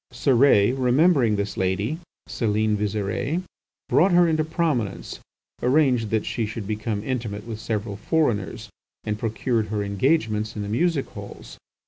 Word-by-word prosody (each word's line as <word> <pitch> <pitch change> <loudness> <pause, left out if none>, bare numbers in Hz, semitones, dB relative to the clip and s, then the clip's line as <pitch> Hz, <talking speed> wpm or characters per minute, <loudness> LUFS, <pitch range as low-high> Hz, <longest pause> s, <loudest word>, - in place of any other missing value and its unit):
Cérès, 120 -3 +4
remembering 130 -2 +4
this 100 0 -3
lady, 100 - -1 0.3
Celine 110 -1 0
Visire, 105 - -2 0.4
brought 185 +6 +4
her 175 0 +6
into 155 -1 +1
prominence, 155 - -2 0.4
arranged 125 -4 +2
that 110 0 0
she 115 -3 -2
should 110 -1 -6
become 110 0 -3
intimate 110 -5 -4
with 110 -2 -6
several 110 -2 -3
foreigners, 110 -7 -1 0.3
and 105 0 -3
procured 115 0 -1
her 105 0 -2
engagements 110 0 0
in 105 - -3
the 100 - -5
music 140 +5 +1
halls. - - -10
110 Hz, 135 wpm, -24 LUFS, 105-135 Hz, 0.4 s, her